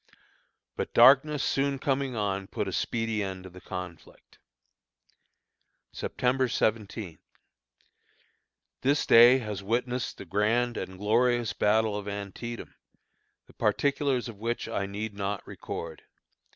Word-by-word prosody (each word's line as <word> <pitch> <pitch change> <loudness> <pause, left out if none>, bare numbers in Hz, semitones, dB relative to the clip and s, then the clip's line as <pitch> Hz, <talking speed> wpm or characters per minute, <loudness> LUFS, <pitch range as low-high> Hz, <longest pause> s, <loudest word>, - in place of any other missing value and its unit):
But - - -4
darkness 135 +4 +6
soon 140 0 0
coming 135 -1 -1
on 100 -2 -2
put 100 - -3
a - - -3
speedy 115 +2 -1
end 95 -2 -4
to 95 - -11
the 90 +1 -13
conflict. 90 -3 -9 1.5
September 130 +1 0
17. 110 -6 -2 1.6
This 140 +3 +2
day 120 +3 +8
has 105 -6 -5
witnessed 120 +4 -2
the - - -9
grand 110 +6 +1
and 95 0 -6
glorious 120 +3 +2
battle 110 0 +2
of 105 0 -5
Antietam, 105 +4 -6 0.7
the - - -20
particulars 140 -3 0
of 110 -4 -9
which 115 +2 -2
I 100 - -2
need 105 +2 -5
not 100 0 -3
record. 80 -1 -7
110 Hz, 120 wpm, -28 LUFS, 100-125 Hz, 1.6 s, day